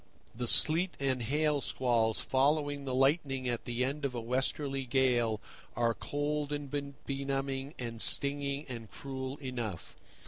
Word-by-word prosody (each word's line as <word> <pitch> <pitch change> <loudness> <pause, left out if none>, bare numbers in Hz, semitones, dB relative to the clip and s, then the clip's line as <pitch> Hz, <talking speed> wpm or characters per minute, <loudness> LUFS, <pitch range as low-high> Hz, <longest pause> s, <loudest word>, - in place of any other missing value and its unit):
The 120 +1 -4
sleet 170 +8 +6
and 130 -2 -1
hail 145 +4 0
squalls 115 -5 0
following 145 +1 0
the 130 -1 -3
lightning 135 -1 +1
at 120 -1 -3
the 120 +1 -1
end 140 +3 -4
of 135 -3 -2
a - - -2
westerly 135 +3 -1
gale 120 -4 +1 0.4
are 115 0 +1
cold 145 +3 -3
and 145 -2 -5 0.3
benumbing 135 +1 -3
and 115 -2 -6
stinging 140 +1 +5
and 115 -4 -8
cruel 130 0 -6
enough. 120 - -6
135 Hz, 140 wpm, -31 LUFS, 125-145 Hz, 0.4 s, sleet